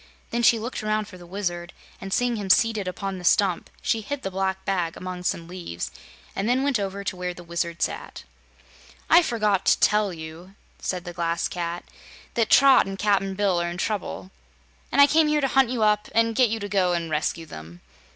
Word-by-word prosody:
Then 235 Hz, -, 0 dB
she 235 Hz, 0 st, +5 dB
looked 230 Hz, +3 st, -4 dB
around 215 Hz, 0 st, -1 dB
for 185 Hz, -4 st, -12 dB
the 175 Hz, -, -13 dB
Wizard 175 Hz, -2 st, -4 dB, 0.3 s
and 195 Hz, -, -7 dB
seeing 245 Hz, +3 st, +1 dB
him 205 Hz, -3 st, -5 dB
seated 215 Hz, 0 st, +3 dB
upon 190 Hz, +1 st, -4 dB
the -, -, -10 dB
stump 185 Hz, 0 st, +2 dB
she 225 Hz, -2 st, +1 dB
hid 285 Hz, +6 st, -5 dB
the 195 Hz, -, -3 dB
black 190 Hz, 0 st, -2 dB
bag 180 Hz, -4 st, -1 dB
among 185 Hz, -1 st, -6 dB
some 170 Hz, -2 st, -2 dB
leaves 175 Hz, -, -6 dB, 0.4 s
and 195 Hz, +3 st, -1 dB
then 255 Hz, +2 st, +2 dB
went 280 Hz, -5 st, +1 dB
over 200 Hz, 0 st, -4 dB
to 190 Hz, -, -3 dB
where 180 Hz, 0 st, -4 dB
the 175 Hz, -, -11 dB
Wizard 170 Hz, 0 st, -2 dB
sat. -, -, -4 dB, 0.9 s
"I 335 Hz, -, +8 dB
forgot 210 Hz, -, +1 dB
to -, -, +4 dB
tell 210 Hz, -2 st, +3 dB
you," 165 Hz, +3 st, -10 dB, 0.2 s
said 180 Hz, -2 st, -3 dB
the 175 Hz, -, -6 dB
Glass 170 Hz, -1 st, -1 dB
Cat, 175 Hz, -1 st, -4 dB, 0.5 s
"that 230 Hz, -2 st, +1 dB
Trot 275 Hz, -6 st, +6 dB
and 195 Hz, 0 st, -5 dB
Cap'n 195 Hz, -2 st, +1 dB
Bill 190 Hz, -3 st, +1 dB
are 170 Hz, -, -1 dB
in 175 Hz, -, -6 dB
trouble, 190 Hz, -1 st, -3 dB, 0.6 s
and -, -, +1 dB
I 280 Hz, -, +10 dB
came 310 Hz, +2 st, +3 dB
here 300 Hz, 0 st, +2 dB
to 275 Hz, -, +1 dB
hunt 265 Hz, -2 st, +3 dB
you 240 Hz, -3 st, 0 dB
up 210 Hz, 0 st, +2 dB
and 230 Hz, 0 st, +3 dB
get 245 Hz, +1 st, +4 dB
you 225 Hz, +1 st, -2 dB
to 205 Hz, -, -3 dB
go 185 Hz, -3 st, +1 dB
and 170 Hz, -2 st, -2 dB
rescue 155 Hz, +2 st, -1 dB
them." 80 Hz, -, -11 dB
195 Hz, 210 wpm, -24 LUFS, 175-220 Hz, 0.9 s, I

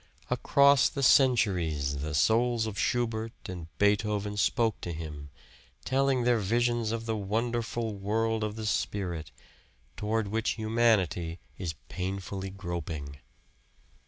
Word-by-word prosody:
Across 140 Hz, -2 st, +5 dB
the 140 Hz, -, -3 dB
centuries 90 Hz, -, +3 dB
the 75 Hz, +2 st, -3 dB
souls 115 Hz, +7 st, +3 dB
of 110 Hz, -2 st, -4 dB
Schubert 115 Hz, -2 st, 0 dB
and 90 Hz, -3 st, -6 dB
Beethoven 105 Hz, 0 st, +1 dB
spoke 110 Hz, +2 st, +1 dB
to 85 Hz, -, -4 dB
him, 75 Hz, -3 st, -7 dB, 0.6 s
telling 135 Hz, -1 st, +2 dB
their 120 Hz, -1 st, +3 dB
visions 120 Hz, +2 st, +1 dB
of 115 Hz, 0 st, -3 dB
the 110 Hz, -1 st, -1 dB
wonderful 115 Hz, +2 st, -2 dB
world 110 Hz, +3 st, 0 dB
of 105 Hz, 0 st, -3 dB
the 110 Hz, -1 st, -5 dB
spirit, 90 Hz, -6 st, -2 dB, 0.7 s
toward 105 Hz, 0 st, -1 dB
which 110 Hz, +1 st, 0 dB
humanity 110 Hz, -7 st, +1 dB, 0.2 s
is 85 Hz, -4 st, -3 dB
painfully 95 Hz, +1 st, -4 dB
groping. 85 Hz, -7 st, -5 dB
105 Hz, 120 wpm, -29 LUFS, 90-115 Hz, 0.7 s, Across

